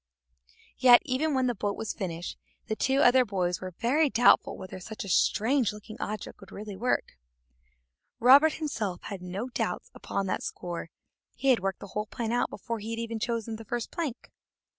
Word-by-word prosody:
Yet, 245 Hz, -1 st, +8 dB
even 290 Hz, +2 st, 0 dB
when 260 Hz, -1 st, +2 dB
the 245 Hz, -, +1 dB
boat 205 Hz, -1 st, -2 dB
was 220 Hz, -, -3 dB
finished, 175 Hz, -3 st, -4 dB, 0.3 s
the 220 Hz, -, -2 dB
two 265 Hz, +5 st, +2 dB
other 255 Hz, +1 st, +6 dB
boys 180 Hz, -5 st, -1 dB
were 185 Hz, -2 st, -7 dB
very 285 Hz, +6 st, +3 dB
doubtful 245 Hz, -1 st, +4 dB
whether 185 Hz, 0 st, -8 dB
such 215 Hz, +4 st, -7 dB
a -, -, -8 dB
strange 230 Hz, +5 st, +2 dB
looking 210 Hz, +1 st, -10 dB
object 215 Hz, 0 st, -5 dB
would 195 Hz, -2 st, -14 dB
really 205 Hz, -1 st, -7 dB
work, 215 Hz, -, -1 dB, 1.0 s
Robert 275 Hz, +6 st, +7 dB
himself 220 Hz, -, -3 dB
had 195 Hz, -3 st, -6 dB
no 190 Hz, +7 st, -4 dB
doubts -, -, -3 dB
upon 195 Hz, -, -3 dB
that 185 Hz, -, -1 dB
score; 175 Hz, -2 st, -5 dB, 0.5 s
he 275 Hz, -, 0 dB
had 255 Hz, -, +5 dB
worked 195 Hz, 0 st, -3 dB
the 200 Hz, -, -8 dB
whole 210 Hz, +1 st, -2 dB
plan 225 Hz, +1 st, -3 dB
out 245 Hz, +1 st, +1 dB
before 230 Hz, -2 st, -5 dB
he 225 Hz, +2 st, -4 dB
had 230 Hz, -1 st, -4 dB
chosen 230 Hz, -1 st, -2 dB
the 225 Hz, -, -9 dB
first 240 Hz, +2 st, -3 dB
plank. 310 Hz, -8 st, -4 dB
225 Hz, 185 wpm, -28 LUFS, 195-250 Hz, 1.0 s, Yet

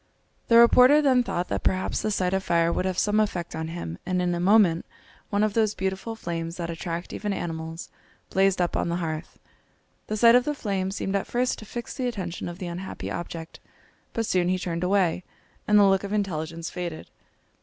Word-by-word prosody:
The 230 Hz, -, +6 dB
reporter 250 Hz, +5 st, +7 dB
then 265 Hz, -4 st, +4 dB
thought 180 Hz, -7 st, -2 dB
that -, -, -1 dB
perhaps 185 Hz, 0 st, 0 dB
the -, -, -1 dB
sight 185 Hz, -3 st, 0 dB
of 190 Hz, 0 st, 0 dB
fire 170 Hz, -1 st, +2 dB
would 185 Hz, -, -1 dB
have 185 Hz, -1 st, -1 dB
some 210 Hz, +2 st, +2 dB
effect 180 Hz, -5 st, -1 dB
on 160 Hz, 0 st, -3 dB
him, 125 Hz, -, -6 dB
and 180 Hz, 0 st, -1 dB
in 180 Hz, -1 st, +1 dB
a 170 Hz, -, -2 dB
moment 185 Hz, -3 st, +4 dB, 0.5 s
one 205 Hz, +1 st, +1 dB
of 215 Hz, -1 st, +1 dB
those 215 Hz, -2 st, +1 dB
beautiful 190 Hz, +4 st, -3 dB
flames, 165 Hz, -4 st, -4 dB
that 170 Hz, -1 st, -3 dB
attract 170 Hz, +1 st, -5 dB
even 210 Hz, -1 st, -3 dB
animals, 165 Hz, -2 st, -5 dB, 0.4 s
blazed 195 Hz, 0 st, +3 dB
up 175 Hz, -1 st, 0 dB
on -, -, 0 dB
the 170 Hz, -, 0 dB
hearth. 160 Hz, -2 st, -4 dB, 0.7 s
The 215 Hz, -, -2 dB
sight 230 Hz, +2 st, +7 dB
of 250 Hz, 0 st, +6 dB
the 295 Hz, +2 st, -2 dB
flame 195 Hz, -6 st, -2 dB
seemed 195 Hz, 0 st, -3 dB
at 200 Hz, -, -1 dB
first 250 Hz, +1 st, 0 dB
to 215 Hz, -, -10 dB
fix 240 Hz, +1 st, -6 dB
the 255 Hz, -2 st, -2 dB
attention 180 Hz, -8 st, -4 dB
of 175 Hz, -, -8 dB
the 185 Hz, -, -6 dB
unhappy 175 Hz, +2 st, -6 dB
object, 165 Hz, -1 st, -6 dB, 0.5 s
but 230 Hz, -, -2 dB
soon 180 Hz, -3 st, +1 dB
he 185 Hz, -, +2 dB
turned 175 Hz, -1 st, -3 dB
away 180 Hz, -2 st, +2 dB, 0.4 s
and 210 Hz, -, +5 dB
the 205 Hz, -, +7 dB
look 195 Hz, 0 st, +3 dB
of 200 Hz, +1 st, -4 dB
intelligence 165 Hz, -5 st, -3 dB
faded. 175 Hz, -3 st, -5 dB
185 Hz, 210 wpm, -26 LUFS, 170-210 Hz, 0.7 s, reporter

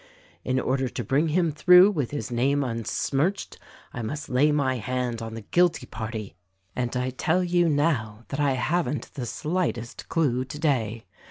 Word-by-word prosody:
In 130 Hz, 0 st, 0 dB
order 130 Hz, 0 st, 0 dB
to 120 Hz, -, -4 dB
bring 140 Hz, +9 st, +1 dB
him 165 Hz, +1 st, +1 dB
through 180 Hz, +6 st, +7 dB
with 145 Hz, -, -2 dB
his 145 Hz, -3 st, -5 dB
name 135 Hz, +4 st, +1 dB
unsmirched 135 Hz, -, -2 dB, 0.3 s
I 120 Hz, -, -4 dB
must 145 Hz, +7 st, -5 dB
lay 140 Hz, +4 st, +3 dB
my 135 Hz, -3 st, +1 dB
hand 125 Hz, -1 st, -2 dB
on 115 Hz, 0 st, -6 dB
the 115 Hz, -, -6 dB
guilty 175 Hz, -, +2 dB
party; 110 Hz, -2 st, -6 dB, 0.4 s
and 125 Hz, 0 st, -2 dB
I 125 Hz, +1 st, -1 dB
tell 160 Hz, +7 st, +1 dB
you, 175 Hz, -1 st, +2 dB
now, 120 Hz, -8 st, 0 dB
that 140 Hz, -, -4 dB
I 145 Hz, -2 st, +2 dB
haven't 155 Hz, +3 st, -1 dB
the 125 Hz, -3 st, -5 dB
slightest 150 Hz, -4 st, -3 dB
clue, 130 Hz, -6 st, +1 dB
today. 125 Hz, -6 st, -1 dB
135 Hz, 165 wpm, -26 LUFS, 120-155 Hz, 0.4 s, through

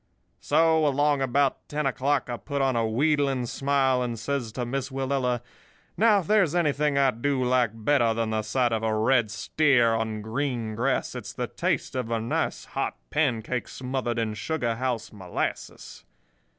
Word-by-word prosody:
"So, 160 Hz, 0 st, +3 dB
along 145 Hz, 0 st, +2 dB
about 135 Hz, +1 st, 0 dB
ten 150 Hz, 0 st, -2 dB
o'clock, 135 Hz, +2 st, 0 dB
I 120 Hz, -1 st, -4 dB
put 140 Hz, +7 st, -4 dB
on 135 Hz, -2 st, +1 dB
a 115 Hz, -1 st, +1 dB
wheedling 135 Hz, +1 st, +1 dB
smile 135 Hz, 0 st, +1 dB
and 120 Hz, -2 st, -2 dB
says 120 Hz, 0 st, -3 dB
to 125 Hz, 0 st, -3 dB
Miss 130 Hz, +2 st, -3 dB
Willella: 130 Hz, -2 st, -1 dB, 0.5 s
'Now, 210 Hz, -2 st, +4 dB
if -, -, -10 dB
there's 190 Hz, -5 st, +3 dB
anything 150 Hz, -3 st, +1 dB
I 135 Hz, -1 st, +4 dB
do 130 Hz, +2 st, -1 dB
like 125 Hz, -1 st, +2 dB
better 115 Hz, +1 st, +2 dB
than 115 Hz, -1 st, -1 dB
the 110 Hz, 0 st, 0 dB
sight 120 Hz, +3 st, 0 dB
of 110 Hz, -1 st, 0 dB
a 110 Hz, -1 st, 0 dB
red 115 Hz, 0 st, +3 dB
steer 120 Hz, -2 st, +2 dB
on 110 Hz, -1 st, -2 dB
green 115 Hz, -1 st, -2 dB
grass 125 Hz, +5 st, -1 dB
it's -, -, -7 dB
the -, -, -2 dB
taste -, -, -2 dB
of 125 Hz, -3 st, -2 dB
a 115 Hz, -1 st, 0 dB
nice 115 Hz, +2 st, -2 dB
hot -, -, -3 dB
pancake 125 Hz, -4 st, 0 dB
smothered 130 Hz, -2 st, -3 dB
in 110 Hz, -2 st, -1 dB
sugar 120 Hz, 0 st, -2 dB
house 125 Hz, -4 st, -2 dB
molasses. 95 Hz, -4 st, -5 dB
130 Hz, 170 wpm, -26 LUFS, 115-140 Hz, 0.5 s, Now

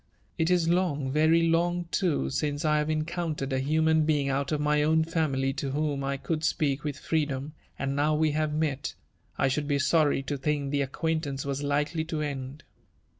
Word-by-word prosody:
It 160 Hz, +1 st, +2 dB
is 175 Hz, -2 st, +3 dB
long, 165 Hz, -6 st, +1 dB
very 160 Hz, +3 st, +4 dB
long 175 Hz, +1 st, +1 dB
too, 155 Hz, -, 0 dB
since 145 Hz, -, -1 dB
I 150 Hz, 0 st, +3 dB
have 150 Hz, -, -1 dB
eneoun 155 Hz, +1 st, -2 dB
tered 135 Hz, -1 st, -3 dB
a 130 Hz, -, +1 dB
human 160 Hz, +3 st, +2 dB
being 150 Hz, -3 st, +1 dB
out 140 Hz, +1 st, -1 dB
of 150 Hz, -, 0 dB
my 150 Hz, 0 st, +2 dB
own 160 Hz, +2 st, +3 dB
family 145 Hz, -5 st, 0 dB
to 140 Hz, -1 st, -3 dB
whom 145 Hz, -2 st, -1 dB
I 140 Hz, 0 st, -1 dB
could 155 Hz, +3 st, -3 dB
speak 145 Hz, -3 st, 0 dB
with 145 Hz, -2 st, -3 dB
freedom; 145 Hz, -2 st, -2 dB, 0.2 s
and 140 Hz, 0 st, -2 dB
now 150 Hz, +2 st, +2 dB
we 155 Hz, 0 st, +2 dB
have 155 Hz, 0 st, 0 dB
met, 150 Hz, -2 st, -2 dB, 0.4 s
I -, -, +2 dB
should 145 Hz, +2 st, -1 dB
be 145 Hz, -1 st, +1 dB
sorry 145 Hz, 0 st, +2 dB
to 140 Hz, +1 st, -3 dB
think 140 Hz, 0 st, -1 dB
the 145 Hz, -1 st, +1 dB
ac 135 Hz, -, -2 dB
quaintance 155 Hz, -5 st, -2 dB
was 140 Hz, 0 st, -2 dB
likely 150 Hz, +2 st, 0 dB
to 160 Hz, -1 st, -3 dB
end." 140 Hz, -1 st, -4 dB
150 Hz, 200 wpm, -28 LUFS, 140-160 Hz, 0.4 s, very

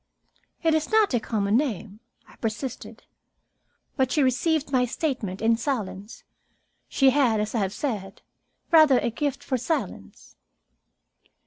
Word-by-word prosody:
"It 325 Hz, -1 st, +3 dB
is 315 Hz, -1 st, 0 dB
not 435 Hz, -7 st, +3 dB
a 240 Hz, -, +3 dB
common 210 Hz, -2 st, -1 dB
name," 220 Hz, -7 st, -3 dB, 0.3 s
I -, -, -18 dB
persisted. 230 Hz, +3 st, -5 dB, 0.9 s
But 260 Hz, -2 st, +1 dB
she 295 Hz, -, +2 dB
received 275 Hz, +4 st, +1 dB
my 255 Hz, -2 st, +3 dB
statement 240 Hz, -, -3 dB
in 230 Hz, +1 st, +4 dB
silence. 215 Hz, -6 st, -4 dB, 0.7 s
She 270 Hz, -2 st, +4 dB
had, 250 Hz, -6 st, +2 dB
as 210 Hz, 0 st, -2 dB
I 235 Hz, -, 0 dB
have 195 Hz, -2 st, -1 dB
said, 205 Hz, -6 st, -5 dB, 0.5 s
rather 310 Hz, -5 st, +7 dB
a 235 Hz, -, 0 dB
gift 285 Hz, +3 st, -3 dB
for 260 Hz, -2 st, -1 dB
silence. 240 Hz, -, -5 dB
250 Hz, 135 wpm, -25 LUFS, 215-285 Hz, 0.9 s, rather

